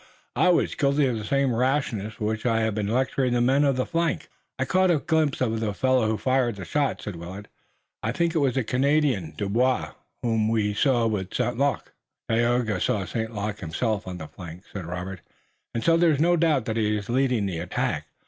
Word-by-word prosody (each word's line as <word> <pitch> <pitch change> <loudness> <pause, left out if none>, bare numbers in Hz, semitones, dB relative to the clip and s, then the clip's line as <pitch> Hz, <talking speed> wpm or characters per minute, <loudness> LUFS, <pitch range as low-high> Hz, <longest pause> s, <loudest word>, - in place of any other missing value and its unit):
I 180 - +4
was 175 - +2
guilty 140 0 +2
of 120 -4 0
the - - -6
same 140 +3 +1
rashness, 115 -4 0
for 105 - -4
which 110 0 -2
I 115 -2 +2
have 110 -1 0
been 105 -1 -2
lecturing 130 +2 +1
the 120 - +2
men 130 +4 +3
on 140 -2 +3
the 130 - 0
flank." 170 -1 -1 0.3
"I 130 - 0
caught 185 +7 +3
a 170 - +4
glimpse 155 -2 0
of 115 -3 0
the 105 -2 -2
fellow 130 -2 +2
who 110 0 0
fired 130 -2 +1
the 100 - -7
shot," 145 -2 -1
said 100 -5 -5
Willet. 95 +5 -8 0.5
"I 115 - -1
think 170 +5 0
it 165 - +2
was 135 -3 +1
the 130 - +1
Canadian, 130 - +1
Dubois, 120 +7 +1 0.3
whom 110 -2 +1
we 105 -2 +1
saw 120 +1 +2
with 105 -4 -2
St. 120 - 0
Luc." 140 -1 -1 0.3
"Tayoga 115 -3 +1
saw 100 -3 0
St. 110 +6 -3
Luc 105 0 -3
himself 100 +5 -2
on 90 -1 -5
the 80 -3 -7
flank," 85 +2 -10
said 95 -4 -5
Robert, 90 +1 -5 0.5
"and 115 - -1
so 165 0 +4
there 170 0 +4
is 145 -3 +2
no 175 +3 +4
doubt 155 -7 +2
that 110 0 -2
he 105 -1 +1
is 100 0 -6
leading 125 -3 +1
the 90 -4 -3
attack. 85 +1 -2
115 Hz, 215 wpm, -25 LUFS, 105-135 Hz, 0.5 s, I